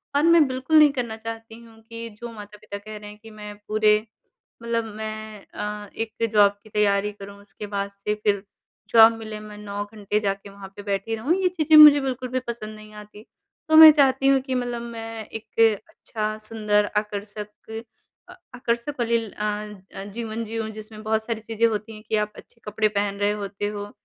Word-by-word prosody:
और 290 - +3
मैं 335 -2 +6
बिल्कुल 260 +4 +1
नहीं 300 -1 +8
करना 240 -5 -3
चाहती 225 0 -8
हूँ 225 -1 -18
कि 230 0 -7
जो 235 - -5
माता-पिता 210 -1 -9
कह 215 +1 -9
रहे 210 0 -10
हैं 210 - -13
कि 225 - -11
मैं 210 -1 -9
पूरे 215 0 +4 0.7
मतलब 230 -1 -1
मैं 215 -1 -7
अ, 210 0 -5
एक 225 0 -2
जॉब 205 -1 +6
की 215 - -16
तैयारी 210 -1 +1
करूँ, 200 0 -11
उसके 205 +1 -10
बाद 200 -1 -3
से 200 +1 -3
फिर 200 -2 +1 0.5
जॉब 225 0 +9
मिले 215 -1 -7
मैं 210 0 -10
9 205 -1 -5
घंटे 210 0 -1
जाके 200 -1 -3
वहाँ 195 0 -11
पे 205 - -8
बैठी 200 +3 -2
रहूँ 265 +10 +1
ये 370 - +3
चीज़ें 315 -3 +2
मुझे 300 -1 +10
बिल्कुल 255 -1 -3
भी 255 +1 -1
पसंद 215 -2 -6
नहीं 215 0 -13
आती। 210 0 -15 0.5
तो 315 - +4
मैं 315 -1 +12
चाहती 275 -2 +3
हूँ 275 0 +5
कि 260 -1 -3
मतलब 245 -1 -2
मैं 225 -1 -7
एक 225 0 -9 0.3
अच्छा, 215 -1 -4
सुंदर, 210 -1 0
आकर्षक 210 +1 -5 0.5
अ, - - -10 0.2
आकर्षक 245 +3 -2
वाली 235 0 +2
अ 210 0 -6 0.5
अ, 195 - -6
जीवन 230 0 -4
जिऊँ, 225 0 -4
जिसमें 215 0 -10
बहुत 220 0 0
सारी 225 -1 -3
चीज़ें 225 +1 +1
होती 220 0 -4
हैं 215 - -12
कि 220 - +1
आप 210 0 -1
अच्छे 230 - -16
कपड़े 215 +1 +1
पहन 200 -1 -1
रहे 205 0 +2
होते 205 0 -4
हो, 205 0 -6
215 Hz, 195 wpm, -24 LUFS, 210-230 Hz, 0.7 s, मैं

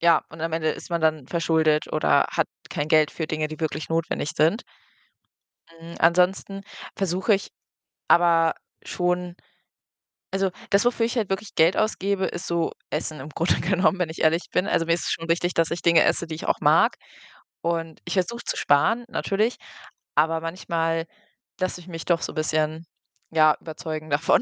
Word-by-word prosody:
ja, 170 -2 +4
und 160 - -11
am 165 0 -2
Ende 160 -1 0
ist - - -8
man 170 - 0
dann 155 -4 +1
verschuldet 160 -2 +1
oder - - +3
hat - - +1 0.2
kein 145 - -2
Geld 155 -1 +4
für 160 - -3
Dinge, 155 0 -1
die 155 +1 -9
wirklich 155 -1 -3
notwendig 165 -2 -1
sind. 165 - +3 1.1
Hm, 165 0 -12
ansonsten 180 +3 +2 0.3
versuche 190 +3 +1
ich 195 - -4 0.6
aber 165 -1 +4 0.3
schon 180 0 -1 1.0
also, 195 0 +1 0.2
das, 200 +2 +4
wofür 240 -1 +2
ich 235 - -3
halt 215 -5 0
wirklich 200 +2 -3
Geld 165 +2 +4
ausgebe, 200 -2 0
ist 175 - -5
so 170 -1 0 0.2
Essen 155 0 -4
im 140 +4 -8
Grunde 165 +4 0
genommen, 190 +1 +2
wenn 170 -3 0
ich 160 - -7
ehrlich 160 +2 +2
bin. 185 - +1
Also, 165 -5 0
mir 165 - +3
ist 170 - -2
es - - -2
schon 165 0 -4
wichtig, 175 +1 +1
dass 165 -1 +2
ich 170 - -4
Dinge 170 -1 +5
esse, - - +1
die 160 - -7
ich 155 - -6
auch - - +1
mag - - +4 0.7
und 165 -1 -2
ich - - -3
versuche 235 +6 -1
zu - - -2
sparen, 225 +12 +2
natürlich, 215 +5 0 0.6
aber 160 +1 +2
manchmal 165 -1 -2 0.5
lasse 185 -1 -2
ich 175 - -16
mich 165 -2 -7
doch 170 -2 +2
so - - -4
bisschen, 155 0 -1 0.5
ja, 155 -1 +5
überzeugen 155 -1 -6
davon. 145 +3 +3
165 Hz, 180 wpm, -24 LUFS, 160-185 Hz, 1.1 s, Dinge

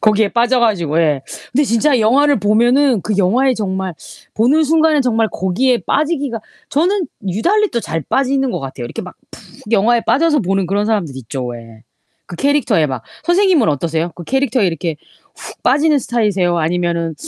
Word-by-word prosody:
거기에 215 -1 +3
빠져 245 +2 +2
가지고 175 -9 +1
예. 150 -5 +1 0.3
근데 285 +4 +2
진짜 250 +2 +2
영화를 275 +3 +3
보면은 240 +4 +3
그 210 +3 -3
영화에 245 +8 +2
정말 190 -4 -3 0.4
보는 280 +8 +3
순간엔 310 -1 +3
정말 225 -3 +1
거기에 235 +7 0
빠지기가 285 -6 -1 0.3
저는 355 +4 0 0.2
유달리 385 - +1
또 235 - -1
잘 165 -6 -4
빠지는 270 - 0
것 - - -3
같아요. 130 -2 -7
이렇게 - - -6
막 - - -10 0.3
푹 215 - -13
영화에 230 +3 +3
빠져서 300 0 +2
보는 195 -1 -1
그런 200 +3 0
사람들 180 -12 -1
있죠 130 +1 -6
왜. 115 -2 -10 0.4
그 175 - -9
캐릭터에 280 - +1
막 130 -4 -5 0.2
선생님은 350 - +3
어떠세요? 160 +3 -1
그 175 - -9
캐릭터에 265 - 0
이렇게 165 -1 -2 0.4
훅 - - -11
빠지는 290 +3 +3
스타일이세요? 205 -8 0
아니면은 170 0 -1
220 Hz, 380 characters per minute, -16 LUFS, 175-275 Hz, 0.4 s, 거기에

